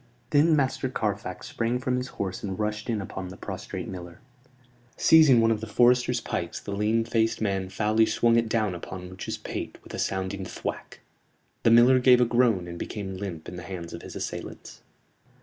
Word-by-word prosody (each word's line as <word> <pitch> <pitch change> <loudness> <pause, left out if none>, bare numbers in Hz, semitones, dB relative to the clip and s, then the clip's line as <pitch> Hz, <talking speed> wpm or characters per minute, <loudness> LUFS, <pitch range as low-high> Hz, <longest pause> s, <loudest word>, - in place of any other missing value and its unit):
Then 155 +2 +5
Master 135 -2 0
Carfax 105 -6 -3
sprang 115 +1 -1
from 125 0 -1
his 125 +1 -3
horse 95 -2 -3
and 95 -2 -4
rushed 105 +1 -3
in 110 -3 0
upon 95 0 -6
the 90 - -10
prostrate - - -6
miller. 90 -2 -8 0.8
Seizing 155 -7 +6
one 115 0 +4
of 110 -1 -1
the 110 - -5
foresters' 120 +3 +3
pikes 85 0 -4
the 100 - -7
lean 105 +3 +1
faced 115 -1 +1
man 95 -3 -1
foully 110 +3 +2
swung 115 +1 +3
it 115 -1 +2
down 110 -4 +1
upon 90 +1 -7
Much's 95 - -5
pate - - -6
with - - -12
a - - -4
sounding 95 0 -2
thwack. 90 - -6 0.6
The - - +4
miller 120 +3 +7
gave 125 -1 +6
a 125 - +5
groan 115 -7 +2
and 85 0 -7
became 95 -3 -5
limp 90 -5 -6
in 90 - -7
the - - -6
hands 85 -2 -7
of 85 - -7
his - - -10
assailants. - - -7
105 Hz, 190 wpm, -26 LUFS, 95-120 Hz, 0.8 s, miller